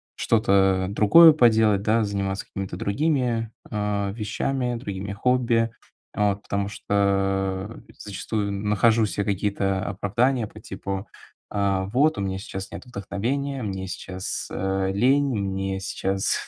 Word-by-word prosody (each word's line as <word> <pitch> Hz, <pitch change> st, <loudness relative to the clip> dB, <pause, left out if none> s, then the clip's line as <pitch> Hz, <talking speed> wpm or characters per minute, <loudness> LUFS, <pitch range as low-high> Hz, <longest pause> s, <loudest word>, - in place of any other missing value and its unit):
что-то, 95 Hz, -4 st, +2 dB
э, -, -, -5 dB
другое 155 Hz, +11 st, +8 dB
поделать, 110 Hz, -7 st, +4 dB
да, 110 Hz, +2 st, +2 dB
заниматься 100 Hz, -1 st, -2 dB
какими-то 100 Hz, -2 st, -6 dB
другими, 120 Hz, -2 st, 0 dB, 0.2 s
э, 105 Hz, -2 st, -1 dB
вещами, 125 Hz, +3 st, -2 dB
другими 100 Hz, -4 st, -5 dB
хобби. 115 Hz, +1 st, +1 dB, 0.4 s
Вот 100 Hz, -1 st, 0 dB
потому 100 Hz, 0 st, -2 dB
что, 105 Hz, -, -6 dB, 1.0 s
э, -, -, -16 dB
зачастую 100 Hz, +1 st, -3 dB
нахожу 105 Hz, +2 st, +2 dB
се 100 Hz, -, -2 dB
какие-то 100 Hz, -1 st, -1 dB
оправдания 115 Hz, +6 st, 0 dB
по 105 Hz, -, -12 dB
типу: 95 Hz, 0 st, -5 dB, 0.4 s
а, 100 Hz, -2 st, 0 dB
вот 135 Hz, +7 st, +2 dB
у -, -, -1 dB
меня 95 Hz, -1 st, -2 dB
сейчас 95 Hz, -1 st, -7 dB
нет -, -, -8 dB
вдохновения, 125 Hz, +5 st, -3 dB
мне 95 Hz, -2 st, -4 dB
сейчас, 95 Hz, 0 st, -5 dB
э, 95 Hz, 0 st, -1 dB
лень, 135 Hz, +7 st, +3 dB
мне 95 Hz, -1 st, -2 dB
сейчас, 95 Hz, 0 st, -1 dB
100 Hz, 130 wpm, -24 LUFS, 95-115 Hz, 1.0 s, другое